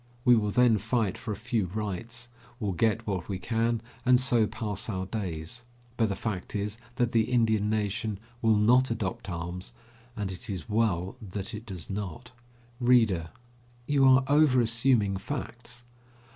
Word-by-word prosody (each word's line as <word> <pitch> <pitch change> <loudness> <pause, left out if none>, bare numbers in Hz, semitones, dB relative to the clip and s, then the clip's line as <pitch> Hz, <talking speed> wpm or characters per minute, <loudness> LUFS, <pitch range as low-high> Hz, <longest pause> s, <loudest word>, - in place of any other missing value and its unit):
We 125 -1 +7
will 105 -2 +1
then 115 0 +4
fight 110 -3 0
for 110 - -6
a - - -2
few 110 -2 -1
rights, 110 +5 -5 0.3
will 105 -4 -1
get 110 +5 +1
what 95 -3 -3
we 95 - -2
can 115 +3 0 0.2
and 125 0 +5
so 120 -4 +3
pass 105 -1 -4
our 95 -3 -2
days. 95 +1 -5 0.3
But 115 -3 +2
the 100 - -1
fact 100 -2 -4
is 105 +2 -2 0.2
that 120 -2 +1
the 115 -1 +3
Indian 110 -4 +2
nation 105 0 -1 0.2
will 110 -1 +4
not 125 +5 +4
adopt 105 -4 -3
arms, 85 +1 -5 0.4
and 100 -2 -2
it 90 +2 -7
is 90 -6 -4
well 100 -5 0
that 100 +2 -5
it 110 +2 -7
does 90 -6 -6
not. 100 +4 -5 0.5
READER: 115 -10 +3 0.6
You 140 0 +3
are 130 +1 +6
overassuming 125 -7 +3
facts. 120 0 -6
110 Hz, 160 wpm, -28 LUFS, 100-120 Hz, 0.6 s, We